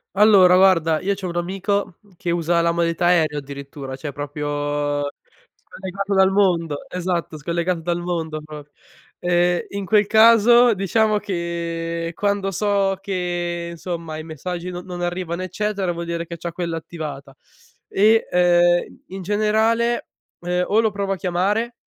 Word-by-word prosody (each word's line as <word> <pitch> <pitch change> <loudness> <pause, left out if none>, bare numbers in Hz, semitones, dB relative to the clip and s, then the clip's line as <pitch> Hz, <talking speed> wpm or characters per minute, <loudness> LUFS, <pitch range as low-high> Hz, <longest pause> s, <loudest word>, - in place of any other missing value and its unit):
Allora 190 -3 +6
guarda, 165 -5 +4
io 200 +1 0
c'ho 190 -2 -5
un 170 - -5
amico, 190 +1 -2
mhmm, 205 - -25
che 170 - -2
usa 170 0 +1
la 170 0 +2
modalità 170 +1 0
aereo 160 -4 +3
addirittura, 140 -1 -7
cioè 145 +2 -6
proprio 145 0 -2 0.5
scollegato 195 +1 -5
dal 190 0 +4
mondo. 170 -7 +1
Esatto, 175 -3 -3
scollegato 170 +3 -1
dal 170 +1 -2
mondo 165 -3 -3
pro 150 -1 -10 0.5
ehm, 175 0 +2
in 200 -1 -5
quel 210 0 +3
caso 230 +2 +6
diciamo 210 +2 +1
che 170 -3 -3
quando 200 0 -1
so 195 0 +1
che, 175 -3 -3
insomma, 165 -2 -6
i 155 - -7
messaggi 175 +3 -5
non 180 0 -6
non 175 -1 -7
arrivano, 175 0 -3
eccetera, 195 -1 -2
vuol 170 0 -5
dire 170 0 -3
che 170 - -6
c'ha 170 +1 -5
quella 170 -1 -3
attivata 150 -4 -7 0.5
e, 220 +3 +3
uhm, 175 0 +3 0.2
in 195 - -6
generale, 220 +4 +1 0.3
uhm, 180 +1 -1
o 215 +3 +3
lo 220 - +1
provo 200 -1 -2
a - - -2
chiamare 195 +6 -1
175 Hz, 150 wpm, -21 LUFS, 165-195 Hz, 0.5 s, Allora